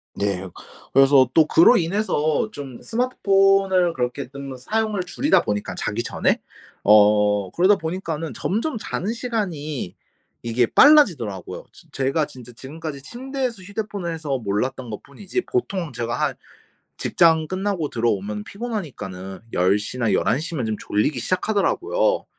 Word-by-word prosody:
네. 100 -2 -2 0.5
그래서 135 -2 +5
또 155 +1 +5
그로 170 +11 +6
인해서 170 -1 0
좀 135 - -8
스마트폰을 195 -6 +2
그렇게 125 +2 -3
좀 140 0 -8
사용을 215 - -1
줄이다 280 +11 +2
보니까 105 0 -3
자기 - - -2
전에 - - 0 0.4
어 105 -1 +4
그러다 185 +4 +4
보니까는 160 - -4
점점 230 - -2
자는 210 0 -3
시간이 175 - -4 0.5
이게 120 +1 +1
빨라지더라고요. 160 - +4
즈 - - -18
제가 135 +3 0
진짜 125 -3 -13
지금까지 140 +3 -8
침대에서 250 - -4
휴대폰을 200 -3 -4
해서 150 -4 -3
몰랐던 120 +3 -2
것뿐이지 165 - -5
보통 190 - -2
제가 115 0 -3
한 - - +1 0.6
직장 160 -2 +3
끝나고 185 -5 -2
들어오면 105 -2 -1
피곤하니까는 115 - -6
10 90 +3 +3
시나 115 +2 -2
11 110 +7 +2
시면 155 -5 -3
좀 110 -1 -1
졸리기 125 +6 0
시작하더라고요. 370 - 0
155 Hz, 315 characters per minute, -22 LUFS, -, 0.6 s, 그로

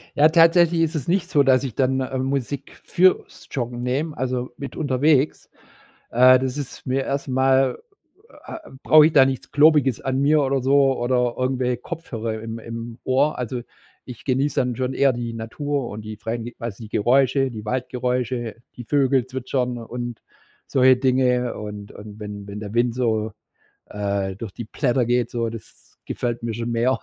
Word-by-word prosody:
Ja, 150 +2 +6
tatsächlich 165 +1 +5
ist 165 0 0
es 145 -5 -3
nicht 185 +1 0
so, 145 - +4
dass 130 -1 +3
ich 130 -6 -5
dann, 130 0 +1
ähm, 130 0 -2
Musik 140 +1 -4
fürs 185 +1 +1
Joggen 120 -2 -4
nehme, 145 +5 -2
also 125 -1 -2
mit 140 -3 -7
unterwegs. 145 0 +1 0.6
Äh, 130 +2 +6
das 130 0 -3
ist 145 -3 -7
mir 135 +1 0
erst 140 0 -3
mal 130 0 +2 0.7
äh, - - -6 0.3
brauche 155 -1 +7
ich 160 - +1
da 135 -3 +6
nichts 130 -1 -4
Globiges 145 -5 +4
an 130 0 -1
mir 150 +2 +4
oder 135 -1 0
so 135 0 +3
oder 125 0 +1
irgendwelche 130 -1 -1
Kopfhörer 115 -9 -5
im 115 0 -6
im 115 +1 -7
Ohr. 135 +4 +2
Also, 125 0 -4 0.4
ich 125 - -11
genieße 135 +2 +1
dann 125 -2 -1
schon 130 0 -2
eher 140 -1 +3
die 120 -1 -5
Natur 135 +4 -3
und 105 +1 -7
die 110 0 -7
freien 115 +2 -4
quasi 115 -1 -7
Geräusche, 130 +5 +2
die 110 -3 -8
Waldgeräusche, 125 -1 -2 0.2
die 120 - -8
Vögel 135 -1 +2
zwitschern 130 -1 -2
und 120 0 -6 0.5
solche 130 -1 +5
Dinge. 125 -1 +1
Und 105 -1 -7
und 105 0 -11
wenn 105 -1 -7
wenn 100 +1 -7
der 105 -1 -7
Wind 120 0 +2
so, 110 -3 -1 0.5
äh, 100 -2 -3
durch 105 -1 -7
die 120 - -7
Blätter 125 +1 0
geht, 120 0 +1
so, 115 -1 -2
das 115 -1 -13
gefällt 120 -1 -3
mir 115 -1 -2
schon 115 +1 -4
mehr. 120 +3 +1
125 Hz, 175 wpm, -22 LUFS, 115-135 Hz, 0.7 s, brauche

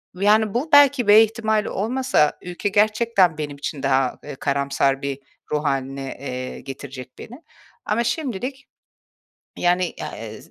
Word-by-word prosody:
yani, 210 +2 +3
bu 260 +7 -1
belki 280 -4 +6
B 210 +2 +9
ihtimali 220 -1 -1
olmasa 240 - +1
ülke 180 +3 -3
gerçekten 210 -4 +2
benim 145 -2 -5
için 145 0 -5
daha, 135 -1 +1
eee, 145 -1 -7
karamsar 140 0 0
bir 140 -1 -4 0.3
ruh 150 0 0
hâline, 135 -1 -3
eee, 130 -2 -6
getirecek 135 -1 -9
beni. 250 +8 -11 0.4
Ama 225 +3 0
şimdilik, 260 +1 -3 0.9
yani, 180 0 +1 0.2
a - - -8
eee, - - -8
z - - -18
185 Hz, 145 wpm, -22 LUFS, 140-225 Hz, 0.9 s, B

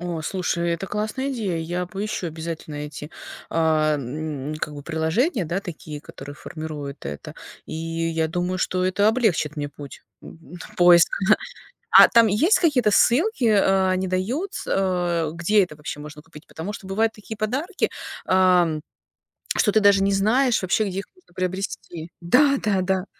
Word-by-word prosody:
О, 175 -2 -4
слушай, 170 -1 -1
это 170 +3 -2
классная 215 +7 -3
идея. 200 -8 -2
Я 175 +2 -3
поищу 195 -1 -4
обязательно 160 -1 -6
эти, 150 +1 -7 0.4
а, 155 -2 +2
м, 145 +2 -5
как 150 - -4
бы 145 - -8
приложения, 170 - 0
да, 175 +5 -2
такие, 155 -5 -8
которые 145 0 -10
формируют 150 -3 -7
это. 70 +1 -7 0.3
И - - -7
я 165 0 -2
думаю, 180 +2 -2
что 185 0 0
это 200 +3 +2
облегчит 205 - +1
мне 145 -1 -3
путь, 145 -1 -11 0.2
м, 165 +2 -13 0.2
поиск, 175 -1 +7 0.2
да. 215 - +7 0.5
А - - +9
там 230 -2 +5
есть 300 - +3
какие-то 250 - +3
ссылки, 295 - +3
э, 195 -3 +3
они 185 0 0
дают 230 - -2
с - - -6
э, 175 -4 0
где 195 +4 +3
это 155 - -12
вообще 150 0 -7
можно 150 0 -10
купить? 165 -1 -15
Потому 175 +6 -6
что 195 - -9
бывают 220 +3 +1
такие 215 +1 -9
подарки, 270 - -1 0.4
а, 185 -2 +4 0.9
что 210 - +3
ты 220 - +4
даже 200 -1 +5
не 200 - +2
знаешь 225 +5 +2
вообще, 210 +4 +1
где 190 +1 -4
их - - -6
можно 365 - -26
приобрести. 185 -3 -4
Да, 275 +11 +4
да, 200 -3 +1
да. 190 0 0
180 Hz, 165 wpm, -23 LUFS, 160-210 Hz, 0.9 s, А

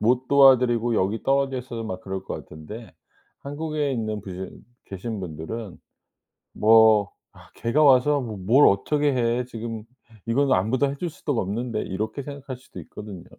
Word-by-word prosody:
못 125 +3 +1
도와 135 -2 +7
드리고 120 -1 0
여기 105 +3 -1
떨어져 135 -1 +1
있어도 120 -2 -6
막 95 -4 -5
그럴 95 0 -5
것 - - -6
같은데 105 +10 -10 0.5
한국에 150 0 -3
있는 110 -4 -3
부신 95 -1 -8 0.2
계신 100 +3 -6
분들은 90 +4 -6 0.8
뭐 110 -2 +5 0.2
'아 - - -18
걔가 130 +7 +1
와서 140 +1 +5
뭐 115 -5 -5
뭘 115 +10 +4
어떻게 145 +9 +1
해. 120 0 0
지금 115 -2 -6 0.4
이거는 135 +4 +2
아무도 125 +9 +1
해 140 - -4
줄 170 +3 -4
수도 145 -5 -3
없는데.' 110 +4 -2
이렇게 110 +8 -4
생각할 140 -2 -8
수도 130 - -12
있거든요. 100 -5 -10
115 Hz, 325 characters per minute, -24 LUFS, 105-135 Hz, 0.8 s, 도와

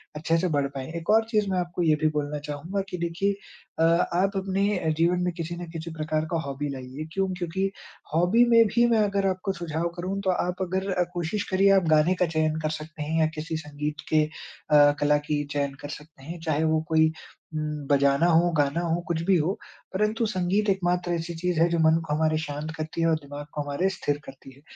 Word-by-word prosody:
अच्छे 165 +2 +1
से 180 - +1
बढ़ 140 -1 +1
पाएँ। 130 -1 -4
एक 165 - -12
और 225 +1 +5
चीज़ 210 -3 +1
मैं 185 - +1
आपको 175 0 -3
ये 155 -2 +4
भी 155 - +4
बोलना 150 0 -2
चाहूँगा 165 +7 -3
कि 180 - -4
देखिए 170 +4 0 0.5
अ, - - +4
आप 175 +4 +2
अपने 195 -3 0
जीवन 170 +2 +2
में 180 -1 0
किसी 170 +1 -4
न 175 -1 -7
किसी 165 0 -6
प्रकार 155 0 -1
का 165 - +1
हॉबी 140 +1 -3
लाइए। 135 +2 -6
क्यों? 195 0 +1
क्योंकि 185 +2 -1 0.4
हॉबी 180 +9 +4
में 230 -1 +7
भी 235 0 +5
मैं 230 -2 +3
अगर 200 -1 +1
आपको 190 +1 -1
सुझाव 170 -1 -2
करूँ 185 +3 -3
तो 195 - -1
आप 180 0 -2
अगर 190 +1 -1 0.2
कोशिश 180 +4 -2
करिए 195 +1 +4
आप 190 - +4
गाने 155 +3 +4
का - - +6
चयन 155 -1 0
कर 155 - 0
सकते 155 0 -7
हैं 160 +2 -1
या 160 - +4
किसी 160 +1 -3
संगीत 150 0 -5
के 155 -1 +4 0.5
अ, 145 -1 +7
कला 150 0 +3
की 150 -1 0
चयन 140 -1 -1
कर 145 - -7
सकते 150 -2 -10
हैं 170 +4 -7
चाहे 160 -2 0
वो 160 0 +2
कोई 160 0 +4 0.4
उम, 155 - -2 0.3
बजाना 140 +2 +3
हो, 175 +1 +4
गाना 145 +3 +1
हो 170 0 0
कुछ 165 -2 -1
भी 195 - +5
हो 165 +5 +1 0.4
परंतु 210 +4 +1
संगीत 200 +1 0
एक 195 -1 +2
मात्र 175 0 0
ऐसी 170 0 -3
चीज़ 175 0 -1
है 165 - +5
जो 170 0 0
मन 160 0 +5
को 150 - -2
हमारे 155 0 +2
शांत 150 0 -5
करती 155 +1 -4
है 165 - +3
और 165 - +3
दिमाग 145 +1 -8
को 150 - -2
हमारे 145 +6 0
स्थिर 145 -6 -2
करती 135 0 -12
है। 140 - -20
165 Hz, 225 wpm, -26 LUFS, 155-185 Hz, 0.5 s, में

